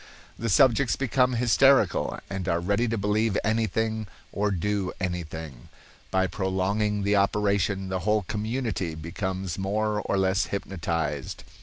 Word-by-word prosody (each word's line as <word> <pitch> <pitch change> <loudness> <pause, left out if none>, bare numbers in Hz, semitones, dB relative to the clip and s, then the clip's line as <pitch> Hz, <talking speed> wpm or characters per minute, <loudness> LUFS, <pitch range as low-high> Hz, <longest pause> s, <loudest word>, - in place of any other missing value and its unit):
The 115 - -2
subjects 130 +3 +4
become 130 -1 +2
hysterical, 125 +3 +3
and 95 -1 -4
are 85 -1 +2
ready 100 +7 +1
to 115 0 -1
believe 105 +1 +1
anything 110 0 0 0.2
or 105 +1 0
do 100 0 -1
anything. 80 -7 -5 0.4
By 95 0 +2
prolonging 100 +2 -1
the 100 +1 +2
operation, 100 -1 +1
a 95 - 0
whole 105 +3 +1
community 110 -4 -2
becomes 95 +3 -4
more 105 +2 0
or 100 - -1
less 95 +1 +2
hypnotized. 85 -7 -3
100 Hz, 130 wpm, -26 LUFS, 95-110 Hz, 0.4 s, subjects